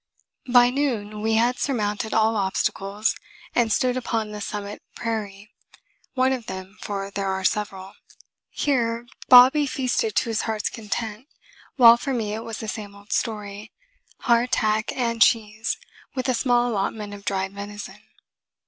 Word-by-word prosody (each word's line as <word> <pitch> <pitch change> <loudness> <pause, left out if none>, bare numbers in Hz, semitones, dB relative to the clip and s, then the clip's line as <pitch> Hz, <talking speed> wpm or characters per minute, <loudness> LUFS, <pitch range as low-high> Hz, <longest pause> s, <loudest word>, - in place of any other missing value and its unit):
By 245 0 +6
noon 225 -7 -2
we 220 +1 +1
had 240 +2 +2
surmounted 220 -4 -1
all 220 0 +3
obstacles 195 +1 0 0.4
and 235 -2 +2
stood 250 +3 +2
upon 225 -4 -2
the 210 0 -6
summit 205 0 -5
prairie 210 -3 -4 0.6
one 260 0 +3
of 245 -3 -5
them, 190 +2 -8
for 200 -1 -4
there 200 0 -2
are 190 0 -2
several. 195 -1 -2 0.6
Here 235 -4 0 0.2
Bobby 260 +4 +8
feasted 270 - -1
to 235 - +1
his 225 - 0
heart's 220 -2 -2
content, 220 +2 -5 0.5
while 235 -3 +8
for 270 +2 -2
me 215 -3 -2
it 220 +1 -4
was 225 -1 -6
the 220 - -6
same 205 -2 -6
old 200 +1 -15
story 210 -1 -3 0.5
hardtack 230 -3 +2
and 230 -3 -1
cheese, 220 0 +2 0.4
with 255 0 -2
a 255 - +2
small 245 0 +2
allotment 205 0 -2
of 200 0 -10
dried 195 -1 -2
venison. 205 +1 -8
220 Hz, 150 wpm, -24 LUFS, 205-240 Hz, 0.6 s, Bobby